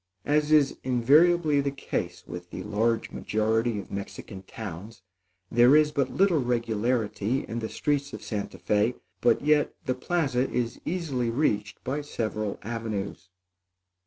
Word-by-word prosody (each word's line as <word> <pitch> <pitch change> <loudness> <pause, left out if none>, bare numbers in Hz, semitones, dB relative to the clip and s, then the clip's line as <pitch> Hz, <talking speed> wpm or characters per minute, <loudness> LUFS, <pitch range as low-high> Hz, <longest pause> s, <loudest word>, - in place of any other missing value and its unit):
As 150 +1 +2
is 150 -3 +4
invariably 145 +5 +4
the 140 - 0
case 140 0 -4
with 90 0 -8
the 90 - -6
large 115 +2 0
majority 110 +1 0
of 100 - -7
Mexican 100 0 -7
towns, 100 +1 -8 0.5
there 120 +4 +6
is 155 -1 +5
but 140 -3 0
little 190 -4 +3
regularity 115 0 0
in 115 - -3
the 110 - -4
streets 140 -1 -1
of - - -8
Santa 100 -3 -4
Fé; 105 +6 +1 0.3
but 120 -1 +3
yet, 150 0 +3
the 130 - +1
plaza 135 -2 0
is 120 -2 -2
easily 150 -9 -1
reached 105 -5 -1
by 140 +4 -2
several 110 -7 -3
avenues. 110 -4 -4
120 Hz, 140 wpm, -27 LUFS, 110-145 Hz, 0.5 s, there